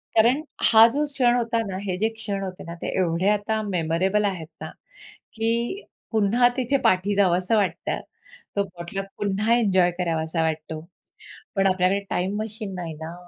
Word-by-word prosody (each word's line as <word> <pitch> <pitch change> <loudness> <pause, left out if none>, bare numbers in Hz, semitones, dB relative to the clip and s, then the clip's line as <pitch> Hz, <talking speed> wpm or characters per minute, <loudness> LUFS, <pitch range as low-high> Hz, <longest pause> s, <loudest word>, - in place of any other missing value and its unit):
कारण, 235 +6 +4 0.3
हा 225 +1 +9
जो 295 +2 +1
क्षण 245 -3 +3
होता 230 -1 0
ना, 190 -1 -4
हे 185 -2 -2
जे 220 +3 +1
क्षण 205 -3 -3
होते 185 -1 -6
ना, 170 - -7
ते - - -3
एवढे 175 +1 +1
आता 210 +1 0
मेमोरेबल 185 +3 +1
आहेत 180 -6 -2
ना, - - -5 0.7
की 235 - -1 0.3
पुन्हा 225 +3 +4
तिथे 260 +1 +1
पाठी 185 +2 +2
जावसं 185 +1 +2
वाटतं. 185 -6 -1 0.5
तो 200 - +1
पोटलक 180 +1 -6
पुन्हा 205 +3 +1
एन्जॉय 190 -7 +3
करावासा 165 -1 -1
वाटतो. 160 0 -2 0.8
पण 195 0 +3
आपल्याकडे 185 +1 +2
टाईम 190 +3 -1
मशीन 215 -2 -5
नाही 170 -3 -5
ना. 165 +1 -6
195 Hz, 160 wpm, -24 LUFS, 180-225 Hz, 0.8 s, हा